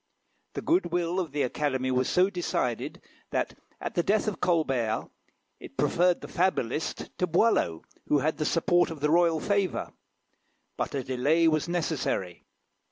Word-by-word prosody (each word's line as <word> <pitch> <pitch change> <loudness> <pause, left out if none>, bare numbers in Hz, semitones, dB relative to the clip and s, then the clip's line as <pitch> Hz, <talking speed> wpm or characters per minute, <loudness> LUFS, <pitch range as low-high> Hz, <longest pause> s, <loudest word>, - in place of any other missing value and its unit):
The - - -5
goodwill 175 - +1
of 170 -6 -3
the 145 0 0
Academy 130 0 -1
was 130 0 +1
so 185 +2 +3
decided, 125 - -2 0.3
that, - - -1 0.3
at - - -4
the 175 - +2
death 210 +5 +1
of 210 - -3
Colbert, 135 -11 +1 0.5
it - - -12
preferred 180 0 +2
the - - -7
fabulist 160 -6 -1
to 180 - +2
Boileau, 165 - +2 0.2
who 150 - +3
had 155 +3 0
the - - -1
support 175 +2 +2
of 160 -2 -7
the 150 +1 +1
royal 170 -1 +4
favour. 200 0 -1 0.8
But - - -3
a 135 - -1
delay 140 +7 +2
was 155 -1 +2
necessary. 155 - -2
160 Hz, 155 wpm, -28 LUFS, 135-175 Hz, 0.8 s, royal